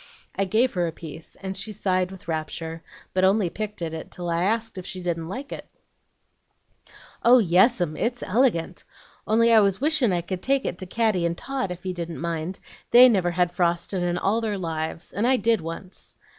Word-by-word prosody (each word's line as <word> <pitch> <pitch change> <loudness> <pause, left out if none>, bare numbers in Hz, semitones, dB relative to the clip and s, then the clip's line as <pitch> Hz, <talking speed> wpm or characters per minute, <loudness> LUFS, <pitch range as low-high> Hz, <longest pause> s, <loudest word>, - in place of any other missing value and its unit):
I 195 - 0
gave 225 +7 +2
her 175 -2 0
a - - -3
piece, 160 0 -10
and 190 0 -4
she 205 +3 -1
sighed 185 -2 0
with 190 -3 -12
rapture, 160 0 -4 0.3
but 185 - +1
only 190 -2 +3
picked 210 -3 -5
at 160 -1 -3
it 160 - -6
till 175 -1 -5
I 170 0 0
asked 225 -1 -1
if 180 - -9
she 185 - -4
didn't 170 -2 -3
like 270 +8 -6
it. - - -7 1.5
"'Oh 245 +2 +7
yes, 200 +3 +4
'm, 165 -4 -1
it's 240 +5 -2
elegant! 190 -6 +1 0.4
Only 230 +2 +4
I 225 - +8
was 195 -2 +2
wishin' 290 -5 +2
I 175 -1 +1
could 180 +1 -5
take 270 0 +1
it 175 - -3
to 185 - -6
Caddy 215 -3 +1
and 170 0 -1
Tot, 270 -7 -3
if 180 +1 -7
you 185 - -2
didn't 170 -2 -5
mind. 170 +2 -3 0.3
They 250 +2 +9
never 190 -6 +2
had 175 0 +1
frostin' 175 +1 0
in 175 0 0
all 210 +5 +1
their 215 -3 -2
lives, 165 -2 -4
and 210 +5 0
I 260 0 +4
did 230 -5 +2
once.' 165 +3 -8
185 Hz, 205 wpm, -25 LUFS, 170-225 Hz, 1.5 s, They